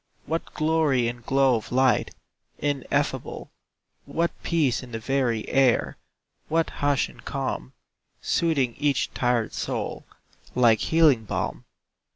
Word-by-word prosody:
What 165 Hz, +2 st, -4 dB
glory 155 Hz, -6 st, +2 dB
and 120 Hz, 0 st, -5 dB
glow 135 Hz, 0 st, +3 dB
of 110 Hz, -, -8 dB
light 130 Hz, +1 st, +2 dB, 0.4 s
Ineffable; 145 Hz, -3 st, -2 dB, 0.5 s
What 170 Hz, +1 st, 0 dB
peace 150 Hz, -8 st, +1 dB
in 125 Hz, -2 st, -11 dB
the 115 Hz, -, -3 dB
very 120 Hz, -2 st, 0 dB
air, 135 Hz, -3 st, +2 dB, 0.5 s
What 165 Hz, +1 st, +1 dB
hush 145 Hz, -2 st, +1 dB
and -, -, -16 dB
calm, 65 Hz, -, -4 dB, 0.5 s
Soothing 140 Hz, -8 st, +1 dB
each 145 Hz, -2 st, +1 dB
tired 120 Hz, -3 st, 0 dB
soul -, -, -3 dB, 0.5 s
Like 115 Hz, -3 st, +5 dB
healing 155 Hz, -9 st, +3 dB
balm! -, -, -3 dB
135 Hz, 120 wpm, -25 LUFS, 120-150 Hz, 0.5 s, Like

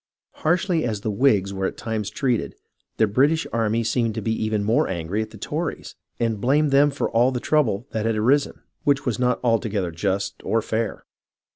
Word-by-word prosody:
Harshly 175 Hz, +1 st, +1 dB
as 110 Hz, -4 st, -2 dB
the 110 Hz, -, -2 dB
Whigs 100 Hz, -4 st, +2 dB
were 95 Hz, 0 st, -1 dB
at -, -, -6 dB
times 110 Hz, -3 st, -3 dB
treated, 125 Hz, 0 st, -1 dB, 0.4 s
the 110 Hz, -, +4 dB
British 140 Hz, +10 st, +2 dB
army 115 Hz, 0 st, +1 dB
seemed 115 Hz, -1 st, 0 dB
to -, -, -3 dB
be 110 Hz, -, 0 dB
even 110 Hz, -2 st, -1 dB
more 110 Hz, +3 st, +2 dB
angry 90 Hz, +3 st, -2 dB
at 110 Hz, -, -4 dB
the 110 Hz, -, -12 dB
Tories, 155 Hz, -, -4 dB, 0.3 s
and 115 Hz, -3 st, -1 dB
blamed 145 Hz, +4 st, +2 dB
them 140 Hz, +2 st, +5 dB
for 140 Hz, -, -2 dB
all 120 Hz, +3 st, +3 dB
the 125 Hz, -, -2 dB
trouble 125 Hz, -7 st, +1 dB
that 110 Hz, 0 st, -1 dB
had 115 Hz, -, +1 dB
arisen, 130 Hz, +7 st, +1 dB, 0.2 s
which 140 Hz, -2 st, +2 dB
was 125 Hz, -2 st, -1 dB
not 125 Hz, -1 st, +1 dB
altogether 110 Hz, -6 st, 0 dB
just 95 Hz, +3 st, -2 dB
or 115 Hz, -, +1 dB
fair. 110 Hz, -1 st, -3 dB
115 Hz, 190 wpm, -23 LUFS, 105-135 Hz, 0.4 s, them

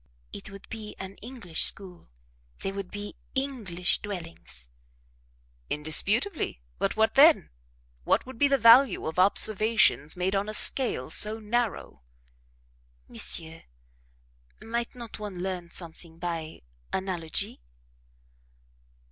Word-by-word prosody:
"It 100 Hz, -, -6 dB
would 195 Hz, 0 st, -12 dB
be 215 Hz, -2 st, -8 dB
an 190 Hz, +1 st, -8 dB
English 215 Hz, -8 st, -3 dB
school; 185 Hz, -3 st, -4 dB, 0.5 s
they 195 Hz, -, -1 dB
would 195 Hz, -2 st, -6 dB
be 205 Hz, 0 st, -7 dB, 0.2 s
English 225 Hz, -11 st, 0 dB
dwellings." 165 Hz, -, -8 dB, 1.0 s
"Indisputably; 200 Hz, -, +1 dB, 0.2 s
but -, -, 0 dB
what 220 Hz, 0 st, +3 dB
then? 300 Hz, +3 st, +6 dB, 0.5 s
What -, -, +2 dB
would 255 Hz, -2 st, -11 dB
be 285 Hz, -, +5 dB
the 275 Hz, 0 st, +3 dB
value 235 Hz, -1 st, +6 dB
of 160 Hz, +3 st, -3 dB
observations 205 Hz, -5 st, +3 dB
made 185 Hz, +2 st, 0 dB
on 200 Hz, +2 st, -1 dB
a 215 Hz, -, -2 dB
scale 210 Hz, -, +3 dB
so 215 Hz, +5 st, 0 dB
narrow?" 225 Hz, -, -2 dB, 1.1 s
"Monsieur, 165 Hz, 0 st, -3 dB, 1.0 s
might 235 Hz, +2 st, -4 dB
not 235 Hz, -3 st, -9 dB
one 205 Hz, -3 st, -6 dB
learn 180 Hz, -3 st, -4 dB
something 165 Hz, -1 st, -6 dB
by 165 Hz, -, -5 dB, 0.3 s
analogy? 175 Hz, -, -2 dB
195 Hz, 115 wpm, -27 LUFS, 170-230 Hz, 1.1 s, then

